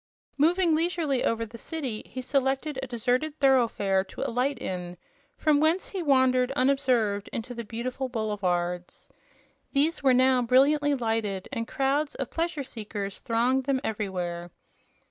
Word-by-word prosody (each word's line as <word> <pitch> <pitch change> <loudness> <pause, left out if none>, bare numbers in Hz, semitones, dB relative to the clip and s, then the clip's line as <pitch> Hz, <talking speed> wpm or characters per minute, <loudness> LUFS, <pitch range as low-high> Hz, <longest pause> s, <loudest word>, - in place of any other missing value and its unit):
Moving 335 +3 +3
leisurely 315 -4 0
over 230 0 0
the 230 +1 -12
city, 270 -9 -4
he 255 - -6
selected 270 +1 0
a 265 - -4
deserted 250 +5 -1
thoroughfare 230 -8 +3
to - - -9
alight 255 +4 0
in, 180 -1 -5 0.4
from 300 -2 +3
whence 320 +5 +2
he 385 - -4
wandered 260 -4 +3
unobserved 255 -7 +1
into 235 +2 -5
the 235 -1 -5
beautiful 245 +4 -4
boulevards. 180 -6 -2 0.6
These 300 +4 +2
were 265 -3 +4
now 255 0 +4
brilliantly 285 +4 +4
lighted, 225 -6 -2
and 230 -3 -3
crowds 280 +2 0
of 270 - -4
pleasure 330 -3 -2
seekers 210 -5 -6
thronged 250 +3 +1
them 275 -1 +1
everywhere. 180 -6 -3
255 Hz, 140 wpm, -27 LUFS, 220-280 Hz, 0.6 s, were